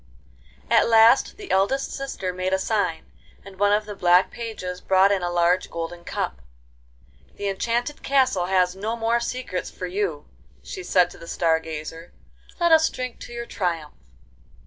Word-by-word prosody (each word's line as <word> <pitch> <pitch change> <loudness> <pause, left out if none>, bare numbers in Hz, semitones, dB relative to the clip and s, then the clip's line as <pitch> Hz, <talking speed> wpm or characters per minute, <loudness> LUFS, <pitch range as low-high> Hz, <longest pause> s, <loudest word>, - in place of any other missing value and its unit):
XV - - -26
At - - +5
last 225 +3 +5
the 405 -2 -8
eldest 200 +9 +1
sister 230 -9 -4
made 185 +1 -2
a - - +4
sign, 195 -4 -1 0.3
and 195 -1 -13
one 205 0 +4
of 210 +1 +2
the 210 - -6
black 180 -1 +3
pages 210 -6 -6
brought 190 +1 +4
in 195 -2 +1
a 175 - -1
large 175 +1 +2
golden 170 +1 -6
cup. 65 - -4 0.9
'The 205 - -4
enchanted 235 +8 -2
castle 260 -10 +2
has 185 -1 +2
no 215 +4 -3
more 230 +1 +1
secrets 235 -6 -4
for 185 - -7
you,' 180 -5 -2 0.4
she 185 - -7
said 180 0 +2
to - - -13
the 170 - -11
Star 165 -1 +1
Gazer. 160 +1 -8 0.5
'Let 340 -1 +3
us 320 0 +6
drink 255 -1 -6
to - - -10
your 235 0 -5
triumph. 170 -9 -3
190 Hz, 170 wpm, -24 LUFS, 175-230 Hz, 0.9 s, us